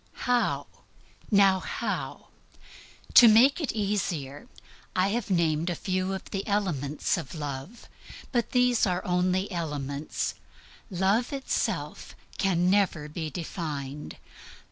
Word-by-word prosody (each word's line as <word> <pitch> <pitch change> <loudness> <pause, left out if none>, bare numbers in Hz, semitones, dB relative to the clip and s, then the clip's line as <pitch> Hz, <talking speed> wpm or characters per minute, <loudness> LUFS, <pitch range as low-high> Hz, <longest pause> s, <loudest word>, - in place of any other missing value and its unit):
How? 245 -1 +1 0.6
Now, 195 -2 +5
how? - - -4 0.8
To 240 - +10
make 245 +9 +6
it 295 - -1
easier, 190 -10 -2 0.5
I 185 +1 +3
have 225 0 -2
named 165 -2 +1
a 175 - -1
few 185 +2 -1
of 190 - -7
the 195 -1 -3
elements 165 -9 0
of 135 - -8
love. 145 - -6 0.4
But 240 -3 0
these 250 -3 +3
are 180 +1 -1
only 185 +2 +1
elements. 145 -4 -3 0.6
Love 195 +5 +1
itself 275 -1 -3 0.2
can 180 -2 +2
never 185 -6 +2
be 155 0 -4
defined. 150 -3 -5
185 Hz, 115 wpm, -27 LUFS, 155-205 Hz, 0.8 s, To